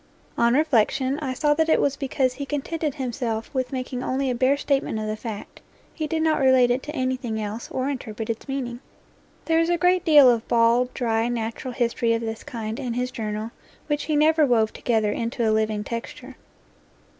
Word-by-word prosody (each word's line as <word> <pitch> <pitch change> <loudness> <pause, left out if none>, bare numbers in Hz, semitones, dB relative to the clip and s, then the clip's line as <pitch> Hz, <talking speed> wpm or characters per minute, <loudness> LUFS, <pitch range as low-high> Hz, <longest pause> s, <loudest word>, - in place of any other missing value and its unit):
On 235 +1 +3
reflection 270 -1 +2
I 265 -4 -3
saw 295 +2 +2
that 320 +1 +1
it - - +4
was 280 -1 +1
because 265 -2 0
he 280 +2 -5
contented 295 +1 -2
himself 240 -3 -3
with 255 -2 -2
making 255 -1 -4
only 265 0 -1
a - - 0
bare 260 +3 +2
statement 275 -5 0
of 215 - -3
the 215 0 -2
fact 215 -2 -8 0.3
he 310 -2 -3
did 320 0 -1
not 315 -1 +2
relate 260 -2 +5
it 250 +2 0
to 300 +3 -7
anything 255 -4 -2
else 215 +2 -5
or 260 +1 -2
inter 260 -5 -4
pret 220 0 -5
its 230 +3 -4
meaning. 255 -3 -4 0.7
There 325 0 +2
is 330 +1 +2
a 345 - +2
great 360 +1 +3
deal 295 -5 +7
of 235 -2 +2
bald, 235 +2 +3
dry, 230 -2 0
natural 235 +1 -4
history 235 -1 +1
of 230 - -1
this 225 -1 -5
kind 225 -1 -5
in 240 -3 -3
his 250 +1 -2
Journal 215 0 -4 0.3
which 295 -1 -2
he 310 - 0
never 310 +1 +4
wove 230 -5 +2
together 220 -3 0
into 230 +1 -1
a 215 - +3
living 215 -1 0
texture. 230 +2 -7
250 Hz, 200 wpm, -24 LUFS, 230-280 Hz, 0.7 s, deal